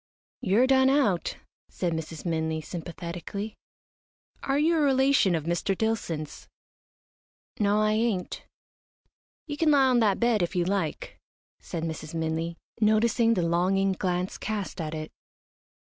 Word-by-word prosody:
"You're 225 +2 +3
done 265 0 +4
out," 245 -11 +1 0.3
said 175 -2 -2
Mrs. 160 0 -6
Minley, 160 -1 -1
sympathetically. 175 +4 -6 0.9
"Are 275 +1 0
you 320 +3 +3
a - - +2
relation 265 - +3
of 160 - -2
Mr. 175 +4 -1
Dillson's?" 175 -9 -3 1.1
"No, 205 0 +3
I 215 0 +3
ain't." 215 -4 -1 1.0
"You 290 -2 -5
can 320 0 +3
lie 280 -2 +5
on 250 -1 +4
that 205 -4 +2
bed 235 -3 +2
if 175 +2 -1
you 175 -1 +1
like," 190 -4 -2 0.4
said 165 -2 -5
Mrs. 160 0 -5
Minley, 165 +1 -2 0.3
noticing 225 +2 +3
the 180 - +1
longing 185 +3 +2
glance 180 -1 -2
cast 205 -4 -4
at 155 0 -4
it. 155 0 -6
195 Hz, 135 wpm, -27 LUFS, 170-230 Hz, 1.1 s, lie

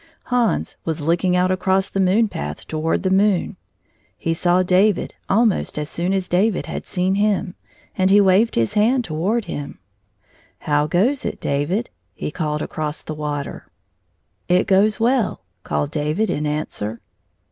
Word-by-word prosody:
Hans 240 -3 +1
was 160 -1 -2
looking 170 +4 +1
out 180 +1 +2
across 190 +1 +1
the 195 - -3
moon 195 +4 +3
path 75 - -6
toward 160 +1 -1
the 185 - +1
moon. 195 -1 +2 0.6
He 165 - -1
saw 175 +2 +2
David 185 +2 +2 0.2
almost 215 -4 +2
as 150 0 -4
soon 175 +2 -1
as 190 -1 0
David 190 +2 +1
had - - -6
seen 185 0 0
him, 205 -2 +1 0.4
and 185 -1 +2
he 200 +1 +6
waved 200 +3 +4
his 115 -1 +1
hand 240 +5 +3
toward 200 +6 -1
him. 145 -5 -6 0.8
"How 150 -1 +1
goes 220 - +1
it, - - -4
David?" 160 +12 -1 0.2
he - - -4
called 150 -2 -2
across 155 -1 -4
the 155 - -5
water. 150 -2 -5 0.4
" 90 +2 -47
It 185 - +1
goes 205 +3 +3
well," 235 - +1 0.2
called 145 - -2
David 155 +8 0
in 150 0 -1
answer. 115 -7 -3
180 Hz, 160 wpm, -21 LUFS, 150-205 Hz, 0.8 s, he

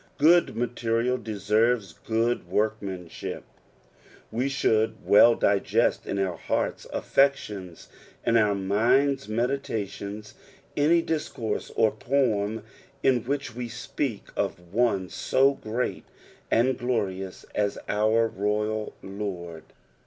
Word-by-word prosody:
Good 170 +4 +5
materia) 120 0 0
deserves 110 -2 0
good 115 +1 -1
work 110 +4 0
manship. 95 -4 -6 0.9
We 125 +5 0
should 110 -5 +1
well 115 +3 +7
digest 100 -1 +1
in 100 - -2
our 95 -3 -1
heart's - - -2
affections 105 - 0 0.4
and 115 - +3
our 105 -3 +4
mind's 120 +7 +2
meditations 110 -4 -3 0.4
any 165 +3 +4
discourse 125 -9 -3
or 110 - +4
poem 110 -3 0 0.4
in 125 -3 +3
which 140 -1 -2
we 120 -1 -4
speak 115 -1 -3
of 90 +1 -3
one 110 -5 +2
SO 135 +8 +2
great 120 0 -3 0.4
and 130 +3 +2
glorious 95 -6 -2
as 100 -1 0
our 110 +2 +2
Royal 105 +1 -2
Lord. 90 -5 -6
110 Hz, 110 wpm, -26 LUFS, 100-125 Hz, 0.9 s, well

